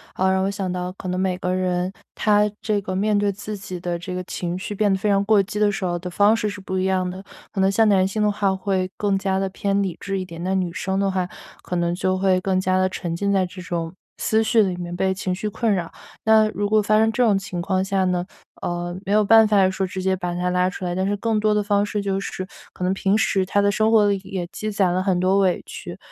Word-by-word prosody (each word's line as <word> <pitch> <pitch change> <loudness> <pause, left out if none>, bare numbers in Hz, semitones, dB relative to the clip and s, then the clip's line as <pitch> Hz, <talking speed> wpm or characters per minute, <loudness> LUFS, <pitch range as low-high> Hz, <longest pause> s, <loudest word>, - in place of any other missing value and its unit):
呃， 190 0 +2
让 190 0 +1
我 195 - 0
想 195 -2 -3
到 180 0 -3
可 190 - -8
能 180 0 -1
每 185 -1 0
个 180 0 -1
人， 185 0 0 0.2
他 210 -1 +3
这 215 -2 0
个 185 0 -4
面 210 +2 +2
对 205 0 +2
自 210 +2 -6
己 185 -2 -7
的 175 0 -3
这 180 +2 -6
个 180 0 -3
情 175 0 -4
绪 205 +2 -5
变 205 0 +2
得 - - +1
非 210 - 0
常 200 0 +3
过 210 -1 +5
激 195 +2 -4
的 210 -1 +3
时 195 - -4
候 175 -1 0
的 180 +1 -6
方 205 +4 +4
式 220 -2 -1
是 205 0 -7
不 190 0 -3
一 185 - 0
样 185 -1 +1
的。 185 +2 -8 0.3
可 200 - -4
能 190 0 +4
像 220 +2 +4
男 190 -2 +4
性 215 +3 -2
的 210 0 +3
话 200 -2 0
会 190 -1 -1
更 200 -2 +1
加 190 0 0
地 195 0 -1
偏 200 +1 0
理 190 -4 -2
智 195 -1 -3
一 185 - -4
点， 170 -1 -9
那 190 - 0
女 185 -2 0
生 190 +3 -2
的 195 - +1
话 185 -2 -1 0.4
可 180 - -4
能 170 0 0
就 185 +1 0
会 190 -1 +2
更 185 0 +1
加 185 0 +1
地 185 0 +3
沉 170 -2 -4
浸 200 +3 0
在 190 -1 +2
这 185 +1 -9
种， 170 -2 -4 0.2
思 220 0 +1
绪 225 0 +4
里 190 -3 +1
面 175 0 -5
被 190 +1 +1
情 190 -1 -3
绪 210 +3 -3
困 220 +1 0
扰。 175 -4 -2 0.3
那 220 0 +5
如 205 -1 -2
果 215 0 +4
发 215 +1 +2
生 220 0 +3
这 245 +3 +1
种 210 -4 +4
情 195 -3 -4
况 190 +1 0
下 195 0 0
呢， 180 -1 0 0.4
呃， 175 0 -3
没 195 - -3
有 210 +1 +4
办 220 +1 +6
法 200 -3 +4
说 190 0 -2
直 185 +1 -5
接 190 0 +2
把 180 -1 -3
她 180 0 -1
拉 180 0 +2
出 185 - -8
来， 175 - -1
但 190 +1 -1
是 205 - 0
更 220 +1 0
多 215 0 +2
的 210 0 +1
方 205 0 +2
式 210 0 -2
就 195 -1 -1
是， 190 -1 -5 0.3
可 - - -6
能 185 +1 +2
平 195 +1 +1
时 195 -3 +1
她 205 - +1
的 200 0 +3
生 215 +2 +2
活 215 -2 +5
里 200 -1 +1
也 185 -2 -4
积 215 - -4
攒 190 -3 +2
了 185 - +1
很 185 -2 +1
多 190 +2 +3
委 185 -3 +1
屈， - - -8
190 Hz, 300 characters per minute, -22 LUFS, 185-205 Hz, 0.4 s, 办